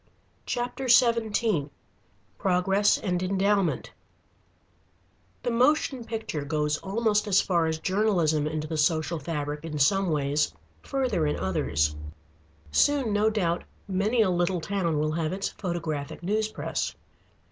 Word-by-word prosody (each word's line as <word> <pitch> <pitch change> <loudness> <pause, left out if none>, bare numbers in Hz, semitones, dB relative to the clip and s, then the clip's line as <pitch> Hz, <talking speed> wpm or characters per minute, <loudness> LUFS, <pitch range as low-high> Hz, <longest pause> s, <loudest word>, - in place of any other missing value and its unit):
CHAPTER 245 +2 -3
XVII 230 - +3 0.7
PROGRESS 195 +2 +3
AND 180 -3 -2
ENDOWMENT 195 0 +1 1.5
The 245 - 0
moving 255 +1 +2
picture 220 -10 -4
goes 150 0 0
almost 210 +1 0
as 195 -2 +4
far 170 -3 +1
as 160 0 -1
journalism 175 -5 +1
into 155 0 -3
the 160 0 -3
social 160 +2 +1
fabric 150 -1 -4
in 155 -2 -5
some 195 +6 +3
ways, 145 - 0 0.3
further 250 - 0
in 150 - 0
others. 75 -5 0 0.8
Soon, 270 - +3
no 210 +1 +3
doubt, 175 -6 0 0.2
many 205 +5 +2
a 190 - +1
little 175 +1 +1
town 170 -3 -1
will 155 +1 0
have 160 +1 -1
its 195 +1 -2
photographic 165 -5 -4
news 215 +4 0
press. 215 - -3
180 Hz, 125 wpm, -27 LUFS, 155-215 Hz, 1.5 s, as